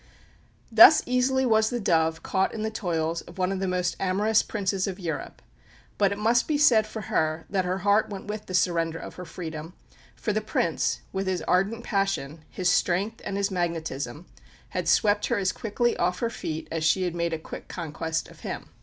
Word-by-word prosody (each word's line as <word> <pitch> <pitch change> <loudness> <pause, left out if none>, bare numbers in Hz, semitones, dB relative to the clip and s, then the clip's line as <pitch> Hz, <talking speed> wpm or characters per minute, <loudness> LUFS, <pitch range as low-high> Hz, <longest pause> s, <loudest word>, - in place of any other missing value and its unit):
Thus 330 -3 +9
easily 260 +1 +2
was 220 -2 +3
the 245 - -2
dove 160 -5 +1
caught 190 +2 0
in 215 - -3
the 220 - -1
toils 165 -5 -1
of 175 - -14
one 185 0 0
of 195 - -2
the 190 - -1
most 180 -1 0
amorous 205 +3 +2
Princes 195 -2 -1
of 190 0 -5
Europe; 170 -3 -5 0.6
but 200 -1 +4
it 200 - -3
must 230 +3 +2
be 305 - +1
said 230 -7 +5
for 220 0 -6
her 155 -2 -1
that 190 -2 +1
her 180 +1 -1
heart 205 +1 +3
went 195 -2 -7
with 210 0 -6
the 185 - -3
surrender 165 -2 +1
of - - -8
her 180 - -8
freedom, 165 -1 -7 0.4
for 210 - -2
the 215 - 0
Prince, 130 - 0
with 190 0 -2
his 185 -3 -1
ardent 200 +6 +1
passion, 195 -8 -1
his 185 - -2
strength 195 +7 0
and 195 - -3
his 200 0 0
magnetism, 165 -3 -3 0.4
had 180 -2 -3
swept 205 +4 +3
her 235 - +1
as 190 -2 +1
quickly 235 +2 -1
off 180 +1 +1
her 230 +2 -1
feet 160 -6 -5
as 160 -1 -2
she 185 +4 +3
had 175 -2 -1
made 170 0 -1
a 160 - -1
quick 160 - -9
conquest 160 -1 -3
of - - -16
him. - - -6
190 Hz, 205 wpm, -26 LUFS, 165-215 Hz, 0.6 s, Thus